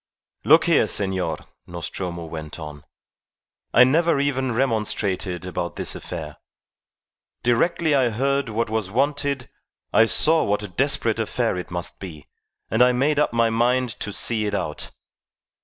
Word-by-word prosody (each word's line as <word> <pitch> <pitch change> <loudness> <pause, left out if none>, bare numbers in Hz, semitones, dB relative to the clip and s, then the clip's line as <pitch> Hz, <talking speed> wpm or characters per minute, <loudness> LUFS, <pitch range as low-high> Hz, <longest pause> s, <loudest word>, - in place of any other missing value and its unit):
"Look - - +6
here, - - +3
senor," 95 -2 0 0.3
Nostromo 85 0 -5
went 80 -2 -7
on. 75 -3 -9 0.9
"I 125 - +7
never 160 +4 +3
even 135 -2 0
remonstrated 105 -7 -1
about 90 -1 -4
this - - -1
affair. 80 -4 -7 1.1
Directly 160 +7 +2
I 130 -4 +3
heard 140 +3 0
what 115 +1 -1
was 110 -3 -2
wanted 140 +2 -1 0.5
I 115 - +6
saw 160 +7 +3
what 105 +1 0
a - - -4
desperate 90 - 0
affair - - -1
it 90 - -6
must 85 0 -3
be, 80 -7 -9 0.5
and 110 - +2
I 125 0 +6
made 145 +4 +1
up 150 - +2
my 115 -1 +2
mind 125 +2 +1
to 105 - -3
see 110 +1 0
it 105 - -2
out. 75 -6 -4
110 Hz, 145 wpm, -23 LUFS, 90-130 Hz, 1.1 s, I